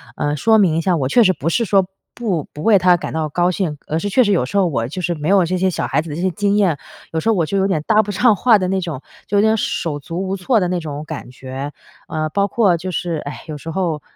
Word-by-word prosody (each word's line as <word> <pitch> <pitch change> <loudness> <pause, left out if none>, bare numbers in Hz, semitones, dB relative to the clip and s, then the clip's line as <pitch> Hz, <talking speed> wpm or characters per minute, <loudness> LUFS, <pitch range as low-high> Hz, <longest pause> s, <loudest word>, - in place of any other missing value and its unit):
呃， 145 0 -1
说 220 +7 +4
明 180 -7 +3
一 - - +1
下 180 +1 +1
我 135 -5 -1
确 240 - +4
实 190 -4 +5
不 165 -1 -2
是 230 +6 +1
说 195 -1 +3 0.3
不 190 - -2
不 150 - -7
为 215 0 +5
她 180 -1 +5
感 - - -6
到 160 -1 -1
高 175 +4 +1
兴， 175 -5 -2
而 155 - -1
是 205 - -3
确 250 +5 +4
实 205 - +1
有 170 -10 +2
时 135 - -8
候 195 - +4
我 115 -8 -1
就 180 +7 -5
是 175 0 -1
没 150 -1 -4
有 195 -1 +5
这 185 +2 -1
些 190 +1 +2
小 180 - -2
孩 140 - +1
子 160 - -9
的 145 - -5
这 170 - -4
些 185 - +1
经 200 +3 0
验， 185 -8 +2 0.3
有 160 - -1
时 160 - -4
候 225 - +3
我 170 -4 +1
就 195 - -2
有 195 0 +2
点 190 -6 0
搭 215 -1 +4
不 210 - -7
上 225 +3 +4
话 225 +3 +4
的 185 -2 -1
那 190 0 0
种， 165 -7 -5 0.3
就 205 - -2
有 - - +5
点 220 +1 +3
手 160 -7 -2
足 170 +6 -5
无 190 +1 -2
措 220 +6 +2
的 180 - +1
那 180 0 -1
种 150 -2 -6
感 155 -5 -7
觉。 130 +2 -7 0.4
呃， 155 -1 -2
包 200 +5 +1
括 200 -5 +2
就 180 +3 -5
是， 175 -1 -2
唉， 145 - -7
有 155 -2 -5
时 160 - -8
候 165 -3 -2
180 Hz, 320 characters per minute, -19 LUFS, 155-200 Hz, 0.4 s, 实